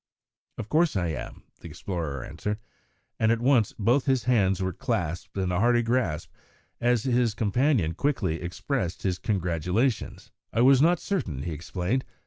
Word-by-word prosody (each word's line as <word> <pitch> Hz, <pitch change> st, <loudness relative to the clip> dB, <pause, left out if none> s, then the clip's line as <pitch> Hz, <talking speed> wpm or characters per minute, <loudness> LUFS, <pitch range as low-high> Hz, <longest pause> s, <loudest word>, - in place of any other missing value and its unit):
"Of 105 Hz, -, -5 dB
course 160 Hz, +2 st, +2 dB
I 90 Hz, -3 st, 0 dB
am," 80 Hz, -, -6 dB, 0.2 s
the -, -, -10 dB
explorer 80 Hz, -9 st, -4 dB
answered, 105 Hz, +8 st, -4 dB, 0.6 s
and 110 Hz, 0 st, +3 dB
at 115 Hz, -, +1 dB
once 120 Hz, -3 st, +3 dB
both 120 Hz, +7 st, +2 dB
his 130 Hz, -3 st, +2 dB
hands 100 Hz, -7 st, +2 dB
were 95 Hz, -1 st, -1 dB
clasped 90 Hz, -, -3 dB
in 95 Hz, -2 st, 0 dB
a 90 Hz, -, 0 dB
hearty 120 Hz, +2 st, +3 dB
grasp 115 Hz, -10 st, -1 dB, 0.5 s
as 120 Hz, -2 st, +2 dB
his 120 Hz, -4 st, +1 dB
companion 110 Hz, -, +1 dB
quickly 90 Hz, -, -1 dB
expressed 90 Hz, +2 st, -3 dB
his 90 Hz, -2 st, -1 dB
congratulations. 95 Hz, -, -1 dB, 0.2 s
"I 115 Hz, -, +1 dB
was 130 Hz, +1 st, +6 dB
not 170 Hz, +2 st, +4 dB
certain," 95 Hz, -, -3 dB
he 85 Hz, -, -3 dB
explained. 90 Hz, -, -2 dB
105 Hz, 155 wpm, -27 LUFS, 90-125 Hz, 0.6 s, was